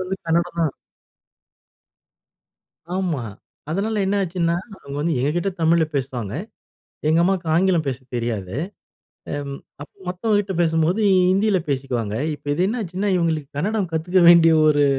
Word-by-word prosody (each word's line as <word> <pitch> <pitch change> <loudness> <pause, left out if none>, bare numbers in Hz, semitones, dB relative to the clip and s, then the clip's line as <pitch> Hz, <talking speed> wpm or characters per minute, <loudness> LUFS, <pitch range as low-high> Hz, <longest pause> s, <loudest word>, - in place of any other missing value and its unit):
வந்து 185 +1 -2
கன்னடம் 170 +1 0
தான். 160 -4 +1 2.2
ஆமா, 180 -8 -1 0.5
அதனால 210 +5 -1
என்ன 200 - +1
ஆச்சுன்னா? 170 -2 0 0.2
அவங்க 140 0 -8
வந்து 160 +2 0
எங்ககிட்ட 165 +8 0
தமிழ்ல 165 0 +4
பேசுவாங்க. 125 -6 -3 0.7
எங்க 160 +2 +4
அம்மாவுக்கு 180 -2 0
ஆங்கிலம் 175 -1 +3
பேச 130 -2 -2 0.2
தெரியாது. 115 -3 -3 0.8
அம் 140 -1 -4 0.3
அப்ப 145 - -12 0.2
மத்தவங்ககிட்ட 200 +1 0
பேசும்போது 160 +4 +1 0.3
ஹிந்தியில 195 +1 +3
பேசிக்குவாங்க. 125 -6 -2 0.2
இப்போ 145 - -10
இது 175 +5 +1
என்ன 235 +2 -2
ஆச்சுன்னா? 190 +2 -2
இவங்களுக்கு 160 -5 0
கன்னடம் 200 +2 -1
கத்துக்க 175 +4 +1
வேண்டிய 170 -1 +7 0.2
ஒரு 145 -1 +4
170 Hz, 130 wpm, -22 LUFS, 145-185 Hz, 2.2 s, வேண்டிய